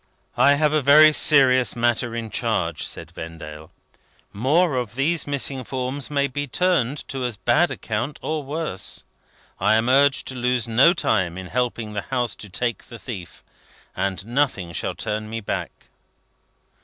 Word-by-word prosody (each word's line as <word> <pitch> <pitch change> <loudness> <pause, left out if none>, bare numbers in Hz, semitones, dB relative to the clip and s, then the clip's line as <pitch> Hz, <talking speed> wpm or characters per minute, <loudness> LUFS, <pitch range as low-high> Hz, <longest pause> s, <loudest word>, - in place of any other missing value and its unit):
"I 140 +3 +5
have 150 +1 +2
a 155 - +3
very 155 +3 +7
serious 130 -5 +4
matter 120 0 0
in 115 -2 -5
charge," - - -1
said - - -7
Vendale; 80 -1 -9 0.6
"more 145 - +2
of 120 -4 -3
these 155 +5 0
missing 140 -2 -1
forms 130 +2 -4
may 140 -1 +1
be 145 +2 -4
turned 145 -1 0
to 135 -1 -4
as 120 -4 -3
bad 120 - +2
account, 120 +7 -4
or 155 -1 -2
worse: 145 - -4 0.6
I - - +3
am 115 +2 +1
urged 140 +1 +4
to 130 - -5
lose 125 -1 0
no 130 +10 +5
time 95 - 0
in 95 - -6
helping 115 0 -2
the 105 - -2
House 125 -1 -2
to 105 - -10
take 120 +2 -3
the 120 - -10
thief; 100 -8 -9 0.5
and 95 0 -2
nothing 115 -9 -1
shall - - -3
turn 110 0 -4
me 115 +1 -4
back." 100 - -3
125 Hz, 160 wpm, -23 LUFS, 110-140 Hz, 0.6 s, very